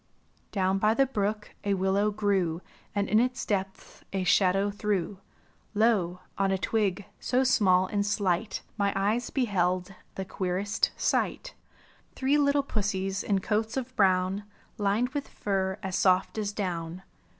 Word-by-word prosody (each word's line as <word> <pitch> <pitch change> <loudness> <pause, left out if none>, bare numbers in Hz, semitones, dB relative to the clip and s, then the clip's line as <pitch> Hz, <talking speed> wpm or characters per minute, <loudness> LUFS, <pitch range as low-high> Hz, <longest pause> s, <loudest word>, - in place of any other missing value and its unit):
Down 190 -1 +1
by 215 +2 +3
the 275 - +4
brook 210 -4 -2
a 200 -1 +1
willow 195 +2 +2
grew 195 -5 0 0.3
And 200 -1 +1
in 215 - +4
its 250 +2 0
depths 195 -2 -4
a 195 -1 -1
shadow 195 +2 +3
threw; 200 -2 -2 0.6
Lo, 205 -5 +2 0.2
on 195 0 +2
a 190 - +1
twig, 205 -1 0
so 255 +1 +1
small 190 -8 +4
and 200 +2 -1
slight. 200 -1 -1 0.2
My 200 0 +2
eyes 210 +5 0
beheld 185 -6 0 0.2
the 190 - -4
queerest 195 +3 -1
sight! - - 0 0.6
Three 275 +3 +2
little 285 0 +3
pussies 195 -5 -2
in 195 -2 0
coats 220 +4 -1
of 255 0 -4
brown 190 0 +2 0.4
Lined 210 +4 +1
with 285 +1 -4
fur 190 -1 -2
as 190 -1 -2
soft 185 +3 +2
as 205 -1 -1
down. 180 -3 -4
200 Hz, 145 wpm, -28 LUFS, 190-215 Hz, 0.6 s, the